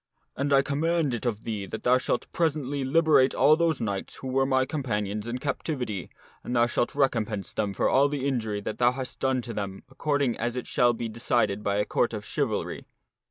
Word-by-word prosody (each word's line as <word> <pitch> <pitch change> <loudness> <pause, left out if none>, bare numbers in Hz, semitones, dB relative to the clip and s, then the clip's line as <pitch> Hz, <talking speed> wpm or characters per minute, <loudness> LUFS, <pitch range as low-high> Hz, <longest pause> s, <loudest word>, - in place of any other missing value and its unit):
And 140 +1 -1
I 135 0 +5
com 140 0 -2
mand 165 -4 +1
it 120 +1 -2
of 110 -2 -2
thee 105 -4 -4
that 110 - -6
thou 125 +1 +4
shalt 125 - -1
presently 145 -4 0
liberate 150 -1 +4
all 155 - +6
those 165 -2 +1
knights 100 -3 -3
who 130 - -7
were 135 +1 +2
my 130 -1 +2
companions 105 -7 -2
in 120 +1 -2
captivity, 130 - -3 0.3
and 125 - -3
thou 120 0 +5
shalt 120 +1 -1
recompense 115 -7 0
them 105 -2 -1
for - - +2
all 140 +2 +4
the 140 -2 -3
injury 110 -6 -1
that 105 - -5
thou 120 0 +4
hast 130 -1 -5
done 130 -2 +1
to 115 - -5
them 100 -2 -5
according 140 -3 0
as 120 0 -2
it 125 - -3
shall 120 -1 +3
be 115 0 -4
decided 110 -2 0
by 100 -1 0
a 105 0 +1
Court 120 - 0
of 105 -1 -6
Chivalry." - - -2
125 Hz, 210 wpm, -27 LUFS, 110-140 Hz, 0.3 s, all